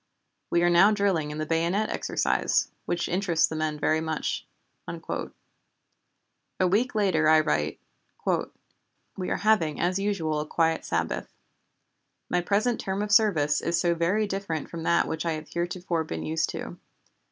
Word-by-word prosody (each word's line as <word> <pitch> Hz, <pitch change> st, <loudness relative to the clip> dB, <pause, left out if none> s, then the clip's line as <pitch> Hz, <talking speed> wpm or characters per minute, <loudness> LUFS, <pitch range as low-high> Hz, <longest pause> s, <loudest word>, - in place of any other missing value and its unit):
We 170 Hz, 0 st, +2 dB
are 175 Hz, -, +4 dB
now 175 Hz, +4 st, +7 dB
drilling 195 Hz, -7 st, +1 dB
in 150 Hz, -, -5 dB
the 155 Hz, -, -2 dB
bayonet 170 Hz, +7 st, 0 dB
exercise, -, -, 0 dB, 0.2 s
which 175 Hz, -, -1 dB
interests 175 Hz, -3 st, +2 dB
the 160 Hz, -, -5 dB
men 155 Hz, -1 st, -1 dB
very 155 Hz, +1 st, +2 dB
much." 160 Hz, -1 st, -3 dB, 0.4 s
A 185 Hz, -, -7 dB
week 220 Hz, +7 st, +1 dB
later 180 Hz, -7 st, +3 dB
I 155 Hz, 0 st, +7 dB
write: 75 Hz, -, 0 dB, 1.4 s
"We 185 Hz, -, -4 dB
are -, -, 0 dB
having 200 Hz, -9 st, +2 dB
as 180 Hz, +2 st, +1 dB
usual 175 Hz, -7 st, -1 dB
a 150 Hz, -, -4 dB
quiet 165 Hz, 0 st, +1 dB
Sabbath. 80 Hz, -1 st, -2 dB, 1.0 s
My 180 Hz, -, +2 dB
present 210 Hz, +6 st, +1 dB
term 195 Hz, +1 st, -2 dB
of 210 Hz, -, -4 dB
service 160 Hz, -10 st, +4 dB
is 170 Hz, 0 st, 0 dB
so 175 Hz, -1 st, +2 dB
very 175 Hz, +6 st, +1 dB
different 195 Hz, -6 st, -4 dB
from 170 Hz, -, -5 dB
that 170 Hz, +1 st, +2 dB
which 160 Hz, -1 st, -3 dB
I 165 Hz, -1 st, 0 dB
have 155 Hz, 0 st, -7 dB
heretofore 175 Hz, -1 st, -2 dB
been 160 Hz, -, -5 dB
used 160 Hz, 0 st, 0 dB
to. -, -, -6 dB
170 Hz, 155 wpm, -27 LUFS, 155-195 Hz, 1.4 s, now